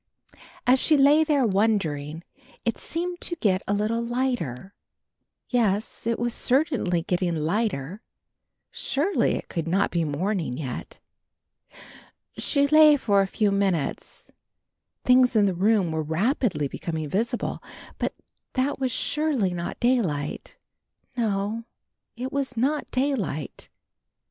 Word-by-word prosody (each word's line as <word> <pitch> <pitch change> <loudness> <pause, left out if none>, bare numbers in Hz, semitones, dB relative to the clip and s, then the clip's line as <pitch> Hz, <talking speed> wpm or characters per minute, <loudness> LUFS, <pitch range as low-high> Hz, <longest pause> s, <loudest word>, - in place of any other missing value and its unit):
As 255 +2 +5
she 305 +2 +4
lay 290 +3 +6
there 295 -4 +2
wondering, 175 -8 0 0.4
it 230 - -1
seemed 350 +2 -4
to 345 - -2
get 195 - +1
a 200 - +1
little 215 +3 0
lighter. 235 - -2 0.7
Yes, 220 -3 0
it 230 - +1
was 240 0 -1
certainly 245 - +1
getting 175 -1 0
lighter, 170 +1 -1 0.7
surely 310 +9 0
it - - -6
could 165 -2 -3
not 190 +4 +1
be 170 -1 +1
morning 160 -2 -2
yet. 130 -5 -6 1.4
She 280 -1 +2
lay 305 0 +7
for 200 -6 +3
a 195 - 0
few 205 +1 +1
minutes, 195 -6 -2 0.7
things 250 -1 +5
in 210 -2 +5
the 195 - +1
room 195 -1 +2
were 160 0 -1
rapidly 165 - 0
becoming 160 +2 -4
visible, 230 - -2 0.4
but - - -2 0.4
that 265 +2 0
was 260 -2 0
surely 265 -7 0
not 170 -1 -5
daylight; 190 - -1 0.6
no, 215 -1 -1 0.5
it 255 +2 -4
was 270 -3 -2
not 285 +6 0
daylight. 255 - -2
215 Hz, 125 wpm, -25 LUFS, 175-255 Hz, 1.4 s, lay